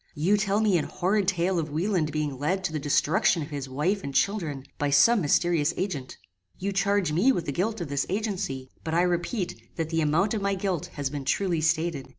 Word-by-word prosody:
You 170 Hz, +7 st, +2 dB
tell 205 Hz, 0 st, +1 dB
me 200 Hz, -5 st, +3 dB
an -, -, -2 dB
horrid 195 Hz, +2 st, 0 dB
tale 185 Hz, -1 st, +1 dB
of 160 Hz, -1 st, -3 dB
Wieland 160 Hz, 0 st, 0 dB
being 145 Hz, -3 st, -2 dB
led 185 Hz, +7 st, 0 dB
to 170 Hz, -, -1 dB
the 155 Hz, -, -1 dB
destruction 150 Hz, +3 st, +2 dB
of 150 Hz, -, -9 dB
his 140 Hz, -2 st, -5 dB
wife 175 Hz, +10 st, -1 dB
and 140 Hz, -1 st, -6 dB
children, 160 Hz, -6 st, 0 dB, 0.2 s
by 145 Hz, -, +1 dB
some 200 Hz, +11 st, +5 dB
mysterious 165 Hz, 0 st, +2 dB
agent. 150 Hz, -9 st, -3 dB, 0.4 s
You 195 Hz, +2 st, -2 dB
charge 195 Hz, -3 st, +1 dB
me 190 Hz, +13 st, +4 dB
with 175 Hz, -10 st, -2 dB
the -, -, -2 dB
guilt 205 Hz, +7 st, -1 dB
of 170 Hz, -, -3 dB
this 140 Hz, 0 st, -1 dB
agency; 185 Hz, -10 st, -3 dB
but 160 Hz, 0 st, -2 dB
I 175 Hz, -, +4 dB
repeat 180 Hz, +3 st, -2 dB
that 165 Hz, -1 st, -3 dB
the 165 Hz, 0 st, +1 dB
amount 160 Hz, +8 st, +2 dB
of 215 Hz, -, -1 dB
my 200 Hz, 0 st, 0 dB
guilt 185 Hz, -4 st, -2 dB
has 140 Hz, -2 st, -3 dB
been 145 Hz, -2 st, -4 dB
truly 170 Hz, +3 st, 0 dB
stated. 160 Hz, -3 st, 0 dB
170 Hz, 215 wpm, -26 LUFS, 150-195 Hz, 0.4 s, some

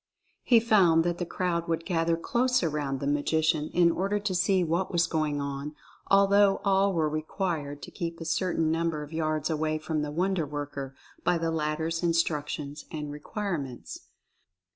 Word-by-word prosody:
He 240 Hz, -3 st, +5 dB
found 190 Hz, -8 st, +4 dB
that 175 Hz, 0 st, -1 dB
the 175 Hz, -, -2 dB
crowd 170 Hz, -2 st, -1 dB
would 165 Hz, 0 st, -1 dB
gather 165 Hz, -2 st, +1 dB
close 250 Hz, +6 st, +1 dB
around 145 Hz, -4 st, -1 dB
the 140 Hz, -, -4 dB
Magician 155 Hz, +2 st, +1 dB
in 170 Hz, -1 st, +4 dB
order 195 Hz, +4 st, 0 dB
to 205 Hz, -2 st, -2 dB
see 185 Hz, +1 st, +2 dB
what 170 Hz, +3 st, -1 dB
was 175 Hz, -1 st, +3 dB
going 155 Hz, -3 st, -1 dB
on, 140 Hz, +1 st, -4 dB, 0.3 s
al 200 Hz, 0 st, +6 dB
though 200 Hz, 0 st, +4 dB
all 195 Hz, 0 st, +3 dB
were 160 Hz, -4 st, +1 dB
required 155 Hz, -2 st, -3 dB
to -, -, -8 dB
keep 165 Hz, -1 st, -5 dB
a 165 Hz, -, -6 dB
certain 165 Hz, -3 st, 0 dB
number 165 Hz, -2 st, -1 dB
of 150 Hz, +2 st, -11 dB
yards 155 Hz, -1 st, -1 dB
away 155 Hz, 0 st, 0 dB
from 155 Hz, 0 st, -2 dB
the 150 Hz, -, -3 dB
wonder 175 Hz, +1 st, 0 dB
worker 140 Hz, -2 st, -5 dB, 0.3 s
by 175 Hz, -, +2 dB
the 165 Hz, 0 st, -1 dB
latter's 160 Hz, +1 st, -1 dB
instructions 150 Hz, -3 st, -1 dB
and 150 Hz, -2 st, -5 dB
requirements. 150 Hz, -, -5 dB
165 Hz, 170 wpm, -28 LUFS, 150-180 Hz, 0.3 s, al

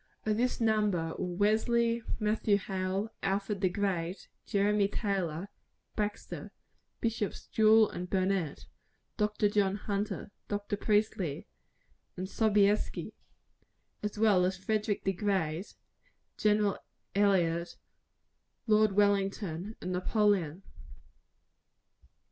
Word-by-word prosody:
Of 215 Hz, -1 st, +2 dB
this 250 Hz, +3 st, 0 dB
number 210 Hz, -8 st, +1 dB
were 180 Hz, -1 st, -3 dB
Wesley, 230 Hz, +3 st, +2 dB, 0.2 s
Matthew 210 Hz, -1 st, +2 dB
Hale, 195 Hz, +2 st, -2 dB
Alfred 195 Hz, +1 st, -1 dB
the 185 Hz, -, +3 dB
Great, 185 Hz, -2 st, -2 dB, 0.2 s
Jeremy 205 Hz, -1 st, +2 dB
Taylor, 195 Hz, -5 st, -2 dB, 0.5 s
Baxter, 210 Hz, 0 st, -4 dB, 0.5 s
Bishops 225 Hz, -3 st, -2 dB
Jewel 220 Hz, 0 st, +5 dB
and 180 Hz, -1 st, -6 dB
Burnet, 185 Hz, -5 st, 0 dB, 0.5 s
Dr. 210 Hz, 0 st, +2 dB
John 205 Hz, -2 st, +2 dB
Hunter, 205 Hz, 0 st, -3 dB, 0.2 s
Dr. 205 Hz, 0 st, -2 dB
Priestly, 205 Hz, -7 st, 0 dB, 0.7 s
and 185 Hz, +1 st, -3 dB
Sobieski 205 Hz, 0 st, +1 dB, 0.9 s
as 210 Hz, 0 st, -4 dB
well 210 Hz, -4 st, +4 dB
as 185 Hz, +1 st, 0 dB
Frederick 210 Hz, +2 st, -1 dB
the 195 Hz, -, +1 dB
Great, 185 Hz, -3 st, -1 dB, 0.6 s
Gen. 210 Hz, -1 st, +2 dB, 0.4 s
Elliot, 175 Hz, -4 st, +2 dB, 0.9 s
Lord 215 Hz, -2 st, +4 dB
Wellington, 200 Hz, -1 st, 0 dB
and 180 Hz, -, -4 dB
Napoleon. 185 Hz, -3 st, +1 dB
200 Hz, 95 wpm, -31 LUFS, 185-210 Hz, 0.9 s, Jewel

